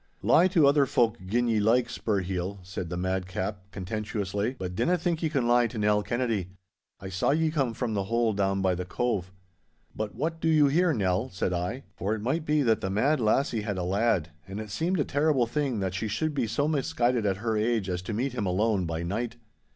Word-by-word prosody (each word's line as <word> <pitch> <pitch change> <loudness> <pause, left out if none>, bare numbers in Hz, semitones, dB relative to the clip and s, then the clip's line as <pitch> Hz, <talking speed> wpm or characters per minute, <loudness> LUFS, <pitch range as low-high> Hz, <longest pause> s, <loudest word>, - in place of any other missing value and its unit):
'Lie 175 - +5
to 175 -5 +4
other 140 0 +4
folk 115 -2 +2
gin 120 +5 +1
ye 110 -2 +2
like, 115 +4 +3
Spurheel,' 95 -5 -2
said 90 -1 -5
the 90 - -3
madcap, 95 +2 -2
contemptuously, 105 +3 -3
'but 90 -3 -4
dinna 180 - +2
think 170 -1 -1
ye 160 - +1
can 135 -6 0
lie 120 0 +4
to 115 - -8
Nell 105 0 +2
Kennedy. 115 -5 -1 0.5
I 95 0 -7
saw 95 0 0
ye 155 +2 +2
come 135 -7 0
from 120 -4 -2
the 100 -2 -1
hole 115 +1 +1
down 95 -1 0
by 95 -1 +3
the 90 +1 -3
Cove.' 95 -1 -2 0.6
'But 110 -1 -4
what 165 +2 -2
do 165 - +1
you 155 -2 +5
here, 175 +4 +3
Nell?' 100 - 0
said 95 -1 -2
I, 90 +10 -3
for 100 +4 -1
it 105 - -7
might 150 +7 -1
be 150 -1 +3
that 115 -3 +2
the 95 - -2
mad 130 +10 +2
lassie 115 +1 +1
had 105 -2 -3
a 90 - -2
lad, 95 -3 +1 0.2
and 95 +2 -6
it 110 -2 -7
seemed 170 - 0
a 145 - +2
terrible 145 -3 +2
thing 130 -3 -1
that 95 -1 -1
she 95 +4 -2
should 155 +9 -1
be 130 -5 0
so 140 +7 0
misguided 125 -6 +1
at 95 -1 0
her 110 +1 -1
age 110 -2 +1
as 90 -1 -2
to 90 - -6
meet 125 +5 -1
him 105 -6 -2
alone 95 0 +1
by 80 0 -3
night. 115 +6 -3
110 Hz, 220 wpm, -27 LUFS, 95-130 Hz, 0.6 s, Lie